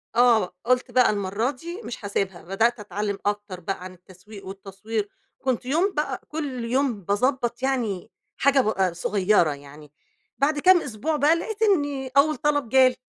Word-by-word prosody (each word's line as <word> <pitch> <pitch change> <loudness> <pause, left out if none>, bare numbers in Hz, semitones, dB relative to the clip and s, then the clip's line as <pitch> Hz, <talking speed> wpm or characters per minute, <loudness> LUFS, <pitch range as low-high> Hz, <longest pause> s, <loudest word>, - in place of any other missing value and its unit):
آه، 235 -6 +4
قُلت 250 0 +1
بقى 250 0 +5
المرّة 205 +5 -1
دي 340 - -8
مش 230 - -7
هاسيبها، 195 -3 -2
بدأت 225 +6 +1
أتعلّم 205 0 -3
أكتر 205 -3 -2
بقى 180 +1 -4
عن 185 0 -8
التسويق 185 +3 -14
والتصوير، 200 +2 -5 0.3
كنت 255 -2 -1
يوم 340 +9 +1
بقى 285 -4 -2
كلّ 275 -6 -4
يوم 250 -3 0
باضبّط 240 +5 0
يعني 225 -7 -1 0.3
حاجة 280 0 +4
ب 215 - -3
آآ 190 -4 +1
صغيّرة 185 -2 +2
يعني 145 +1 -13 0.5
بعد 290 +2 +1
كام 365 +1 +6
أسبوع 285 +6 -2
بقى 300 +3 +4
لقيت 430 +6 -5
إني 290 -10 +1
أول 305 +2 +5
طلب 290 -5 0
جالي. 260 -1 +5
235 Hz, 160 wpm, -24 LUFS, 195-280 Hz, 0.5 s, كام